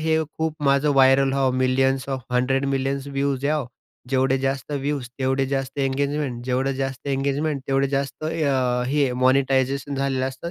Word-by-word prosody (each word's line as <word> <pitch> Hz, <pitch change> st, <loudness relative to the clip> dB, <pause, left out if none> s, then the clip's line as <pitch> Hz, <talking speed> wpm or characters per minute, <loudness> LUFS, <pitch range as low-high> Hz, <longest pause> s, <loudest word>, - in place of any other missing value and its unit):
हे 160 Hz, 0 st, +2 dB, 0.2 s
खूप 160 Hz, -1 st, -2 dB
माझं 140 Hz, +2 st, +3 dB
व्हायरल 135 Hz, 0 st, +5 dB
व्हावं, 135 Hz, -2 st, +1 dB
मिलियन्स 130 Hz, +1 st, +1 dB
ऑफ 135 Hz, -1 st, -2 dB
100 135 Hz, +2 st, +1 dB
मिलियन्स 135 Hz, 0 st, -1 dB
व्ह्यूज 140 Hz, -1 st, -1 dB
यावो. 145 Hz, -3 st, 0 dB, 0.4 s
जेवढे 135 Hz, 0 st, +2 dB
जास्त 135 Hz, +2 st, -2 dB
व्ह्यूज 140 Hz, -2 st, -2 dB
तेवढे 135 Hz, 0 st, +1 dB
जास्त 135 Hz, 0 st, -3 dB
इंगेजमेंट, 140 Hz, -2 st, -1 dB
जेवढं 130 Hz, +2 st, 0 dB
जास्त 135 Hz, +1 st, -4 dB
इंगेजमेंट 140 Hz, +1 st, -1 dB
तेवढे 135 Hz, 0 st, +2 dB
जास्त 140 Hz, +2 st, -3 dB
अ, 135 Hz, -6 st, 0 dB
हे 140 Hz, -2 st, +1 dB
मॉनिटायझेशन 135 Hz, +1 st, +2 dB
झालेलं 135 Hz, -1 st, 0 dB
असतं, 135 Hz, +6 st, -7 dB
135 Hz, 155 wpm, -23 LUFS, 130-140 Hz, 0.4 s, व्हायरल